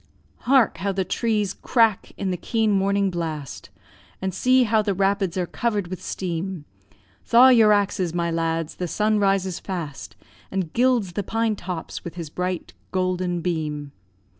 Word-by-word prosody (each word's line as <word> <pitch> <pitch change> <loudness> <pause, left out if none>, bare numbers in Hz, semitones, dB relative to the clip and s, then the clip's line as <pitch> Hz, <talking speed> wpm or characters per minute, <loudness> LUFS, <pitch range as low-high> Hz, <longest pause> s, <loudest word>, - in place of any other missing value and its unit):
&c. - - -25
Hark! 255 -7 +4
how 200 +3 0
the 190 -1 -1
trees 210 -1 0
crack 225 -4 +1
in 195 -2 -2
the - - 0
keen 220 +4 0
morning 200 0 +2
blast, 160 -5 -5 0.5
And 190 -1 -3
see 255 +6 +4
how 220 -1 +3
the 205 -2 -1
rapids 195 -1 +1
are 180 - 0
cover'd 205 -2 -2
with 185 - -6
steam; 180 -2 -4 0.6
Thaw 245 +3 +7
your 225 -4 +6
axes, 195 -4 +1
my 170 0 -1
lads, 165 -1 -2
the 180 - -2
sun 210 +4 +1
rises 195 -2 +1
fast, 170 -7 -6 0.3
And 185 -4 -3
gilds 240 -7 +2
the 205 - -1
pine 225 +2 0
tops 180 -4 -6
with 170 - -7
his 165 -4 -6
bright 180 0 -3 0.2
golden 185 -2 -1
beam. 150 -4 -3
190 Hz, 165 wpm, -23 LUFS, 175-210 Hz, 0.6 s, Thaw